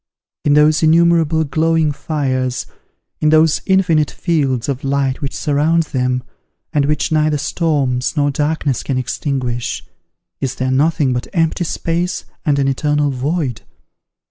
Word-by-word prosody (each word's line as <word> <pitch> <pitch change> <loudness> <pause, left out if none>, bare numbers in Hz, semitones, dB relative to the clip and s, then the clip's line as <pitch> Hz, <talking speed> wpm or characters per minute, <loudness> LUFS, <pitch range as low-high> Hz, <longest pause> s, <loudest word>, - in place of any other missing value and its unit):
In 145 - +3
those 150 +1 +4
innumerable 165 -1 +3
glowing 160 +1 +1
fires, 130 -5 -2 0.5
in 155 - +2
those 155 0 +4
infinite 170 -6 +3
fields 140 -9 -1
of 135 -2 -3
light 135 0 0
which 140 -1 -4
surround 155 +3 +2
them, 125 -3 -1 0.5
and 145 -2 +2
which 150 +3 0
neither 155 -1 +2
storms 145 -4 -1
nor 145 -1 +2
darkness 145 -2 -1
can 135 - -2
extinguish, 125 - -3 0.5
is 130 - -2
there 130 0 -1
nothing 145 -1 +2
but 125 0 -3
empty 165 0 +1
space 170 +3 -2 0.2
and 145 -4 +1
an 140 -1 +1
eternal 145 +1 +1
void? 135 -2 -2
150 Hz, 135 wpm, -17 LUFS, 135-160 Hz, 0.5 s, those